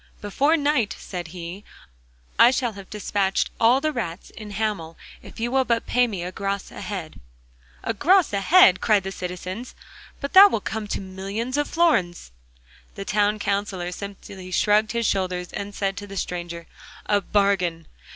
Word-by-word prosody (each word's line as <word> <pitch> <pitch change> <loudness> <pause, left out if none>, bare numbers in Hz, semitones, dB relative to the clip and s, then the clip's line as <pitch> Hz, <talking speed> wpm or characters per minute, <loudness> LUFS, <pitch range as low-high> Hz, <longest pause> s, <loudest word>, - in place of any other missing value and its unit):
'Before 280 +10 +1
night,' 285 -7 +1
said 175 -3 -6
he, 175 +3 -8 0.8
'I 235 - +9
shall 250 -2 0
have 195 -1 -11
despatched 200 -2 -1
all 235 +3 +5
the 310 +2 0
rats 185 - -5
in 215 -2 -10
Hamel 205 -6 -3 0.2
if - - -12
you 235 +1 -1
will 265 0 +3
but 235 -2 0
pay 250 0 +2
me 195 -6 -4
a 180 - -5
gros 195 +1 -3
a - - -9
head.' 185 -7 -6 0.6
'A - - -1
gros 345 - +3
a 200 - 0
head!' 195 - +6
cried 210 -4 +3
the 190 - -4
citizens, 185 +5 -6 0.4
'but 280 - -5
that 395 +2 +10
will 225 - -1
come 215 +1 -4
to - - -3
millions 195 +6 -4
of 290 0 0
florins!' 185 - +1 0.6
The 195 - -6
Town 205 +2 +1
Counsellor 200 -3 -2
simply 195 -1 -9
shrugged 210 +4 +2
his 235 -1 0
shoulders 185 -3 -1
and 205 0 -5
said 195 -1 -1
to 205 - -7
the 195 0 -8
stranger: 175 -2 -4 0.4
'A 205 -1 +2
bargain! 185 -5 +1
200 Hz, 170 wpm, -24 LUFS, 185-230 Hz, 0.8 s, that